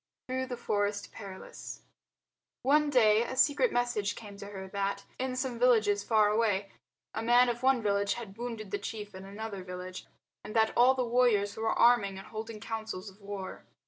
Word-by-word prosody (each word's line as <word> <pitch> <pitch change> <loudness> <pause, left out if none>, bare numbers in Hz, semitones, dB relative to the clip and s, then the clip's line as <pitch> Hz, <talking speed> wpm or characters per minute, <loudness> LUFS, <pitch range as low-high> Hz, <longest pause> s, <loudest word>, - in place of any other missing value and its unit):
Through 260 0 -2
the 250 -1 -5
Forest 205 -3 -1
Perilous 195 -3 -9 0.8
One 295 +3 +4
day 220 -5 +5
a 250 +2 -3
secret 290 - +4
message 240 -4 0
came 205 -3 -10
to 200 0 -8
her 190 -2 -7
that, 200 0 -2
in 255 0 -2
some 255 -2 -2
villages 220 -5 +4
far 215 -2 +4
away, 210 -3 +1 0.4
a 220 - -3
man 240 +2 +5
of 240 0 -3
one 260 -3 +3
village 200 -1 +1
had 220 -5 -8
wounded 225 -3 -6
the 205 - -1
chief 210 0 -6
in 190 0 -9
another 200 -1 -6
village 180 0 -7 0.4
and 215 - -8
that 220 -1 +3
all 255 +2 +6
the 255 -1 0
warriors 230 -4 +2
were 225 0 -1
arming 220 -5 +4
and 195 - -10
holding 220 0 -6
councils 220 -3 -5
of 195 +2 -22
war. 200 -1 -7
220 Hz, 180 wpm, -30 LUFS, 200-245 Hz, 0.8 s, all